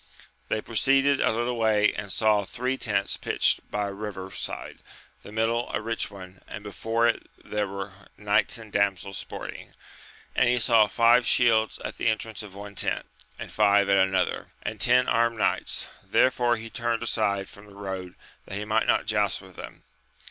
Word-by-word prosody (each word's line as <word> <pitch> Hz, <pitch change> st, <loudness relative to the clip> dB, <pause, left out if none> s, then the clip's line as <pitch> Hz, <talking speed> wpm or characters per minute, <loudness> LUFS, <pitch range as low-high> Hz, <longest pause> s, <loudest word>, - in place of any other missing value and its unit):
They 110 Hz, -, 0 dB
proceeded 135 Hz, +5 st, +3 dB
a -, -, +3 dB
little 120 Hz, +2 st, -1 dB
way 110 Hz, -2 st, +3 dB
and 100 Hz, -1 st, -5 dB
saw 105 Hz, -1 st, +3 dB
three 125 Hz, +6 st, -2 dB
tents 100 Hz, -6 st, -1 dB
pitched -, -, +1 dB
by 105 Hz, -1 st, -1 dB
a -, -, -6 dB
river 100 Hz, -2 st, -6 dB
side, -, -, -6 dB, 0.4 s
the -, -, -12 dB
middle 115 Hz, +2 st, 0 dB
a -, -, -1 dB
rich 115 Hz, 0 st, -2 dB
one, 95 Hz, -2 st, -12 dB
and 105 Hz, -, -8 dB
before 115 Hz, +3 st, -1 dB
it 120 Hz, -, 0 dB, 0.2 s
there 105 Hz, -1 st, -1 dB
were 100 Hz, 0 st, -6 dB, 0.2 s
knights 105 Hz, +4 st, +1 dB
and 110 Hz, -2 st, -12 dB
damsels 100 Hz, -1 st, 0 dB
sporting; -, -, -8 dB, 0.6 s
and 125 Hz, -, +4 dB
he 125 Hz, -, +3 dB
saw 115 Hz, -2 st, +5 dB
five 115 Hz, +2 st, +4 dB
shields 110 Hz, -3 st, +3 dB
at -, -, -6 dB
the -, -, 0 dB
entrance 110 Hz, -1 st, -1 dB
of 100 Hz, -3 st, -11 dB
one 100 Hz, 0 st, -8 dB
tent, -, -, -1 dB, 0.3 s
and -, -, -8 dB
five 100 Hz, -1 st, +4 dB
at 100 Hz, -, +5 dB
another, 95 Hz, 0 st, +1 dB, 0.2 s
and 110 Hz, -3 st, -5 dB
ten 125 Hz, +2 st, +5 dB
armed 115 Hz, 0 st, +2 dB
knights, -, -, 0 dB, 0.2 s
therefore 120 Hz, -2 st, +3 dB
he 115 Hz, 0 st, -8 dB
turned 115 Hz, 0 st, -1 dB
aside 100 Hz, -4 st, 0 dB
from 105 Hz, +1 st, -14 dB
the 100 Hz, -, -15 dB
road 95 Hz, -2 st, -6 dB, 0.3 s
that 95 Hz, -, -6 dB
he 105 Hz, -, -4 dB
might 110 Hz, +1 st, +1 dB
not -, -, +2 dB
joust 105 Hz, -2 st, +1 dB
with 95 Hz, -2 st, -15 dB
them. -, -, -10 dB
105 Hz, 180 wpm, -26 LUFS, 100-115 Hz, 0.6 s, saw